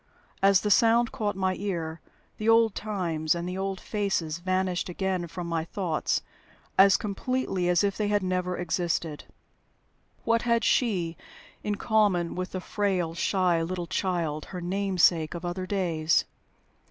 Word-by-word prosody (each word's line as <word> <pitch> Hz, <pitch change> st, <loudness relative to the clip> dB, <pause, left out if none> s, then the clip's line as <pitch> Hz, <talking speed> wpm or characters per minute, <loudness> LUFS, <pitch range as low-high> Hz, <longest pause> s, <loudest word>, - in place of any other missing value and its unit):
As 195 Hz, -1 st, +5 dB
the 210 Hz, -, 0 dB
sound 235 Hz, +2 st, +4 dB
caught 215 Hz, -6 st, -2 dB
my 190 Hz, -1 st, 0 dB
ear, 170 Hz, -5 st, -3 dB, 0.4 s
the 215 Hz, +1 st, +1 dB
old 225 Hz, -2 st, +5 dB
times 170 Hz, -7 st, -1 dB
and 170 Hz, +1 st, -4 dB
the 180 Hz, -, -4 dB
old 190 Hz, 0 st, -3 dB
faces 185 Hz, -7 st, -2 dB
vanished 185 Hz, 0 st, -1 dB
again 185 Hz, -1 st, -2 dB
from 175 Hz, +1 st, -6 dB
my 165 Hz, -1 st, -1 dB
thoughts 170 Hz, -3 st, -1 dB, 0.5 s
as 195 Hz, 0 st, +7 dB
completely 200 Hz, -3 st, -1 dB
as 175 Hz, +2 st, +3 dB
if 200 Hz, -1 st, 0 dB
they 210 Hz, -, 0 dB
had 205 Hz, -1 st, +1 dB
never 180 Hz, -1 st, -1 dB
existed. 170 Hz, -3 st, -2 dB, 1.0 s
What 230 Hz, 0 st, +2 dB
had 235 Hz, -1 st, +1 dB
she 180 Hz, -9 st, +1 dB, 0.5 s
in 210 Hz, -, -1 dB
common 205 Hz, -6 st, +2 dB
with 185 Hz, 0 st, -4 dB
the 185 Hz, -, -3 dB
frail, 185 Hz, -5 st, -1 dB
shy 180 Hz, -1 st, +1 dB
little 175 Hz, +1 st, -3 dB
child, 165 Hz, -4 st, -2 dB
her 180 Hz, -, -7 dB
namesake, 180 Hz, -3 st, +2 dB
of 170 Hz, +1 st, -6 dB
other 185 Hz, +1 st, -3 dB
days? 170 Hz, -5 st, +1 dB
185 Hz, 150 wpm, -27 LUFS, 170-205 Hz, 1.0 s, as